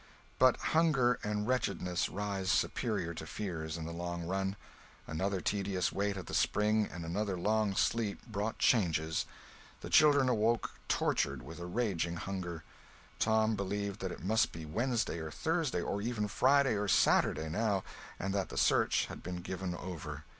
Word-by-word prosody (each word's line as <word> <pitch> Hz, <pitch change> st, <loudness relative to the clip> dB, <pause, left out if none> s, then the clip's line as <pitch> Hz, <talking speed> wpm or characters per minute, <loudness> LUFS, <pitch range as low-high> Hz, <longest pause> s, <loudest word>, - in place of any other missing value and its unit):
But 130 Hz, -1 st, +6 dB, 0.2 s
hunger 150 Hz, -7 st, +3 dB
and 105 Hz, 0 st, -1 dB
wretchedness 90 Hz, -8 st, 0 dB
rise 100 Hz, -1 st, -3 dB
superior 105 Hz, -6 st, 0 dB
to 80 Hz, -1 st, -7 dB
fears 80 Hz, -6 st, -4 dB
in 80 Hz, -, -5 dB
the 85 Hz, -, -5 dB
long 85 Hz, 0 st, -4 dB
run. 95 Hz, +3 st, -1 dB, 0.5 s
Another 95 Hz, +4 st, -2 dB
tedious 95 Hz, -1 st, 0 dB
wait 100 Hz, 0 st, -1 dB
at 95 Hz, -, -6 dB
the -, -, -8 dB
spring 105 Hz, 0 st, +2 dB
and 85 Hz, -2 st, -6 dB
another 95 Hz, +3 st, -1 dB
long 105 Hz, +2 st, +1 dB
sleep 110 Hz, -2 st, 0 dB
brought 105 Hz, +3 st, -3 dB
changes. 80 Hz, -8 st, +2 dB, 0.5 s
The -, -, -7 dB
children 145 Hz, -3 st, +6 dB
awoke 115 Hz, -1 st, +1 dB, 0.2 s
tortured -, -, 0 dB
with 80 Hz, +2 st, -9 dB
a 85 Hz, -, -5 dB
raging 90 Hz, -5 st, -1 dB
hunger. 85 Hz, -2 st, -5 dB, 0.6 s
Tom 110 Hz, 0 st, +3 dB
believed 100 Hz, 0 st, -3 dB
that 95 Hz, -1 st, -3 dB
it -, -, -8 dB
must 110 Hz, +2 st, +3 dB
be 80 Hz, -1 st, -7 dB
Wednesday 115 Hz, -, -1 dB
or 80 Hz, -1 st, -5 dB
Thursday 160 Hz, -, -1 dB
or 100 Hz, -, -2 dB
even 110 Hz, -1 st, -1 dB
Friday 135 Hz, +5 st, +4 dB
or 105 Hz, 0 st, -1 dB
Saturday, 80 Hz, -4 st, +3 dB
now, 100 Hz, +3 st, 0 dB, 0.3 s
and 95 Hz, +1 st, -2 dB
that 100 Hz, -2 st, -1 dB
the -, -, -7 dB
search -, -, +3 dB
had -, -, -9 dB
been 90 Hz, -1 st, -5 dB
given 90 Hz, -1 st, -4 dB
over. 80 Hz, -5 st, -6 dB
100 Hz, 160 wpm, -33 LUFS, 85-110 Hz, 0.6 s, But